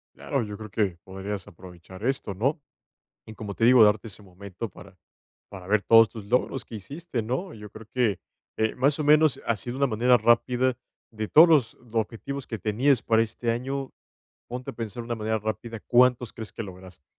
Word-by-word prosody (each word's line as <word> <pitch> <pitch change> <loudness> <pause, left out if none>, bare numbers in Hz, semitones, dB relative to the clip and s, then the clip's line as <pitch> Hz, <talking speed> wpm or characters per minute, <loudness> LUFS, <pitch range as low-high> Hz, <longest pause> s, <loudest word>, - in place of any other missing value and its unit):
Claro, 135 -4 -2
yo 105 -1 -7
creo 110 -1 -9
que 100 -4 0
podrías 95 +1 -6
aprovechar 90 +1 -12
esto, 130 -6 -1
¿no? 135 - 0 0.7
Y, 110 - -10
como 105 -2 -7
te 115 - 0
digo, 125 0 +7
darte 105 0 +2
ese 105 0 -11
momento 100 +3 -8
para 95 +1 -15 0.5
para 95 -2 -10
ver 105 +1 +2
todos 115 +2 +6
tus 110 -3 -9
logros 125 +3 0
que 115 - -12
hiciste, 135 - -5
¿no? 130 - -3
Yo 105 -2 -11
creo 110 0 -12
que, 115 -7 +1 0.4
eh 110 0 +1
más 140 +4 +2
o 155 - -1
menos, 150 -1 +4
así 115 +1 -2
de 125 - -5
una 140 +1 +2
manera 125 +1 +3
rápida, 125 +2 +2 0.3
de 110 -1 -4
todos 160 +9 +7
los 145 -8 +3 0.2
objetivos 120 +5 -3
que 110 - -5
tenías 120 +6 +2
para 115 -1 +3
este 115 +1 -3
año, 135 +3 -3 0.6
ponte 125 +1 -6
a - - -15
pensar 115 0 -6
de - - -11
una 120 - -2
manera 110 0 -1
rápida, 110 +2 -5
¿cuántos 125 -1 +3
crees 110 -2 -9
que 115 - -5
lograste? 90 -6 -12
115 Hz, 195 wpm, -26 LUFS, 105-125 Hz, 0.7 s, digo